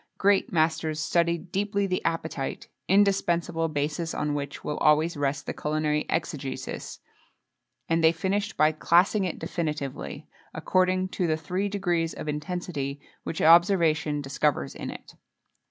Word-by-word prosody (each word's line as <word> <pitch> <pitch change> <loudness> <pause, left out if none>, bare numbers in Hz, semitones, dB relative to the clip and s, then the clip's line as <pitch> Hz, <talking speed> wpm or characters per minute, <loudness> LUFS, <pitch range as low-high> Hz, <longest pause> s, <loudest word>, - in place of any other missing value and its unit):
Great 200 0 +3
masters 160 -1 +1
studied 170 +2 0
deeply 200 +1 0
the 185 -1 -1
appetite 160 -4 -3 0.2
indispensable 175 -4 +2
basis, 155 +2 -2
on 150 0 -1
which 145 -1 -5
will 150 - -3
always 155 +2 +3
rest 145 0 -1
the - - -3
culinary 150 0 -1
exegesis; 140 -5 -4 0.9
and 165 0 +1
they 160 - +7
finished 200 +5 -2
by 155 0 +5
classing 175 +6 +3
it 180 - -3
definitively, 150 -5 -4 0.3
according 185 0 +1
to 180 -1 -2
the 155 -1 +1
three 180 +6 -2
degrees 175 -5 -1
of - - -7
intensity 150 -2 -3 0.2
which 160 - -3
observation 165 -3 +4
discovers 135 - 0
in - - -6
it. - - -10
165 Hz, 135 wpm, -27 LUFS, 150-180 Hz, 0.9 s, they